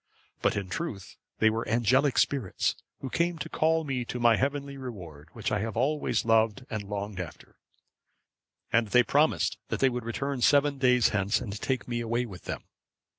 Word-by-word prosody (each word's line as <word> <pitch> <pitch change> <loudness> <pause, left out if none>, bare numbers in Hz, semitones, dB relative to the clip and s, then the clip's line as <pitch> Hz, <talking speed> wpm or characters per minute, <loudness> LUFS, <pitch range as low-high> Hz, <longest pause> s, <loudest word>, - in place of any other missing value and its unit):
But - - +2
in 100 -2 -3
truth 100 - -5 0.2
they 110 0 +4
were 115 +1 -3
angelic 125 +5 +3
spirits, 130 -10 +1 0.3
who 135 - -5
came 170 0 0
to - - -5
call 160 +1 +2
me 135 -4 -2
to 125 - -5
my 120 -1 +5
heavenly 140 +2 -2
reward, 90 - -9
which 110 - -3
I 105 - +1
have 110 +1 -3
always 145 +2 +1
loved 115 +2 +2
and 110 -2 -2
longed 100 -1 -4
after, 85 -3 -9 1.1
and 115 -1 +3
they 125 +4 +5
promised 150 +5 +2
that - - -3
they 135 - +4
would 125 -1 -4
return 135 +3 -3
seven 145 +2 +4
days 125 -3 +4
hence, 100 0 +1
and 100 - -5
take 130 -2 -1
me 120 -1 -2
away 120 +1 -1
with 95 -6 -11
them." - - -5
120 Hz, 180 wpm, -28 LUFS, 110-140 Hz, 1.1 s, my